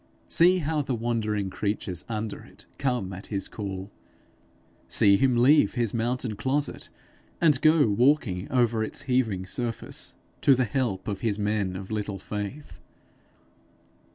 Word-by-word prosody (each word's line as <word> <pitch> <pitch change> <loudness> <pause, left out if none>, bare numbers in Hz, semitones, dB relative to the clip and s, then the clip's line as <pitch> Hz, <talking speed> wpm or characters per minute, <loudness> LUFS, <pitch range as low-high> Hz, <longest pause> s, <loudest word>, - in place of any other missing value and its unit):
See 180 +2 +5
how 155 -2 -1
the 135 -3 -2
wandering 110 -4 -1
creatures 100 -4 -3
under 110 -1 -4
it - - -16
come 125 -8 -1
at 95 +2 -9
his 100 -2 -3
call! 100 -1 -6 1.0
See 100 -1 +5
him 130 +2 +2
leave 135 +5 +5
his 120 -4 0
mountain 120 0 -1
closet, 140 +6 -2 0.5
and 150 -6 +3
go 155 -1 +5
walking 110 -2 +1
over 120 -4 +2
its 110 - -4
heaving 120 -8 0
surface 115 +4 -4 0.3
to 135 - +6
the 130 0 +1
help 105 -5 -2
of 100 -2 -3
his 110 -4 0
men 105 -3 -1
of 95 +2 -7
little 105 -2 -3
faith! 105 +9 -6
115 Hz, 140 wpm, -26 LUFS, 100-130 Hz, 1.0 s, to